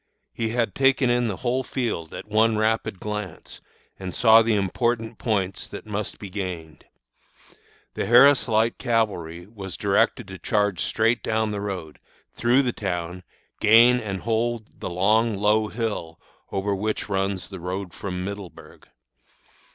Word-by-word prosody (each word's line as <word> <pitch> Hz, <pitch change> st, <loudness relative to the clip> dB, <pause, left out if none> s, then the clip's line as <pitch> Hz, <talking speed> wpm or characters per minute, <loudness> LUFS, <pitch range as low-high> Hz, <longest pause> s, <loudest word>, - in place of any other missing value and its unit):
He 115 Hz, -1 st, -2 dB
had 115 Hz, -3 st, 0 dB
taken 135 Hz, 0 st, +3 dB
in 120 Hz, 0 st, +2 dB
the 105 Hz, -, -2 dB
whole 125 Hz, +2 st, +1 dB
field 115 Hz, -11 st, -3 dB
at -, -, -8 dB
one 110 Hz, +1 st, +3 dB
rapid 110 Hz, -3 st, 0 dB
glance, 105 Hz, -1 st, -6 dB, 0.4 s
and 95 Hz, -2 st, -5 dB
saw 115 Hz, -1 st, +7 dB
the 115 Hz, -1 st, +2 dB
important 110 Hz, +3 st, -1 dB
points 95 Hz, -5 st, -1 dB
that -, -, -9 dB
must 105 Hz, -1 st, -4 dB
be 105 Hz, -, -8 dB
gained. 90 Hz, -6 st, -6 dB, 1.1 s
The -, -, -3 dB
Harris 135 Hz, +4 st, +6 dB
Light 115 Hz, 0 st, +1 dB
Cavalry 90 Hz, -8 st, -1 dB
was 100 Hz, -2 st, -8 dB
directed 105 Hz, +3 st, +1 dB
to 95 Hz, -1 st, -8 dB
charge 105 Hz, -4 st, 0 dB
straight 115 Hz, +2 st, +1 dB
down 110 Hz, -1 st, 0 dB
the 100 Hz, -1 st, -3 dB
road, 95 Hz, -7 st, -5 dB, 0.3 s
through 120 Hz, +3 st, +3 dB
the 125 Hz, -2 st, -1 dB
town, 90 Hz, -2 st, -4 dB, 0.4 s
gain 115 Hz, +3 st, +6 dB
and 100 Hz, -5 st, -4 dB
hold 115 Hz, 0 st, -2 dB
the -, -, -4 dB
long, 105 Hz, +5 st, +2 dB
low 105 Hz, +2 st, +2 dB
hill 105 Hz, -8 st, -4 dB, 0.3 s
over 100 Hz, +1 st, -1 dB
which 105 Hz, +2 st, -2 dB
runs 95 Hz, -2 st, -2 dB
the 95 Hz, -2 st, -8 dB
road 90 Hz, +1 st, -5 dB
from 90 Hz, -2 st, -5 dB
Middleburg. 100 Hz, -2 st, -9 dB
105 Hz, 150 wpm, -24 LUFS, 95-115 Hz, 1.1 s, saw